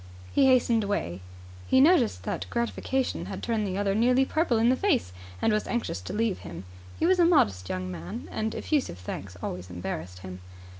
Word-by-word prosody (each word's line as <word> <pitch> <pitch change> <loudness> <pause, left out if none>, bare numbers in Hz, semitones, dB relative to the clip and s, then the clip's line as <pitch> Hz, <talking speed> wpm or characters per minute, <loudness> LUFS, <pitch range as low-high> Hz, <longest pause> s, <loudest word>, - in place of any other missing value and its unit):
He 275 - +5
hastened 240 -3 +4
away. 95 - -2 0.5
He 260 - +4
noticed 265 - +4
that - - -3
gratification 245 +2 -1
had - - -6
turned 225 -3 0
the 185 0 -3
other 200 -1 +1
nearly 250 +5 +3
purple 310 -5 +1
in 230 +2 +4
the 255 - +4
face, 265 - +1 0.3
and 220 - +2
was 215 - 0
anxious 235 - -2
to 90 - -7
leave 220 -2 0
him. 90 +1 -8 0.3
He - - +1
was 365 +1 +4
a - - +6
modest 100 - +3
young 90 0 -3
man, 85 +1 -7
and 220 0 -2
effusive 290 - -1
thanks 90 +1 -7
always 90 +1 -5
embarrassed 90 0 -6
him. 90 0 -7
215 Hz, 190 wpm, -27 LUFS, -, 0.5 s, a